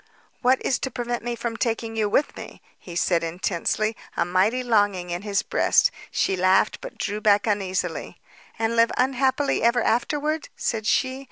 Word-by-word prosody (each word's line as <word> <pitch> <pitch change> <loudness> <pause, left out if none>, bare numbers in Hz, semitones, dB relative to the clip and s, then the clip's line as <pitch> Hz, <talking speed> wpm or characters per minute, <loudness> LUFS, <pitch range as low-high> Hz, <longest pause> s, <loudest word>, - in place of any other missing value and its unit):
"What 255 +1 +3
is 255 - +1
to 265 - -3
prevent 240 -1 -4
me 240 0 -3
from 235 -1 -4
taking 230 -1 -2
you 215 -2 0
with 285 - +1
me?" - - -10 0.2
he 175 - -10
said 170 -1 +1
intensely, 180 +5 -1 0.2
a - - +2
mighty 195 +8 +1
longing 205 -6 +1
in 175 +1 -3
his 200 -1 -1
breast. - - +3 0.2
She 190 - 0
laughed 185 +2 +2
but - - -9
drew 210 +1 -3
back 205 -1 +4
uneasily. 195 -3 -2 0.4
"And 225 +1 0
live 230 0 +4
unhappily 265 +2 +1
ever 235 0 +3
afterward?" 295 +7 0
said 220 -2 -2
she. 260 +2 +1
225 Hz, 170 wpm, -24 LUFS, 195-245 Hz, 0.4 s, back